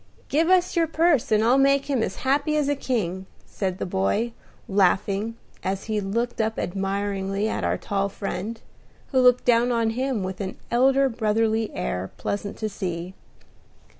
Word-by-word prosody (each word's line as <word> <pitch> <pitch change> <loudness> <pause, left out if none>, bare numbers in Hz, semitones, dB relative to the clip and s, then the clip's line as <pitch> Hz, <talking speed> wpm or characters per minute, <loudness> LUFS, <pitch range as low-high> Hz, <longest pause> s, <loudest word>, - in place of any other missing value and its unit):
Give 320 +4 +2
us 365 -1 +3
your 335 -1 +3
purse, 320 -6 +2
and 215 0 +4
I'll 250 +4 +4
make 275 0 +4
him 275 -4 0
as - - -2
happy 285 +3 +2
as 295 -2 +1
a 290 - +1
king," 190 -9 -2 0.2
said 185 -2 -3
the - - -3
boy, 180 - 0 0.3
laughing, 200 +3 +1 0.3
as 190 0 -2
he 215 -1 -1
looked 230 +4 -1
up 220 0 -1
admiringly 195 +1 -1
at - - -2
our - - +1
tall 200 -1 -1
friend, 200 +3 -4 0.5
who 260 - +3
looked 250 -1 +5
down 240 0 +4
on 230 -2 +1
him 255 -3 -1
with 185 +2 -4
an 190 -1 -4
elder 270 +3 +4
brotherly 225 -2 0
air 90 +10 -3
pleasant 200 0 -3
to 220 - -2
see. 180 -3 -4
220 Hz, 165 wpm, -24 LUFS, 195-260 Hz, 0.5 s, looked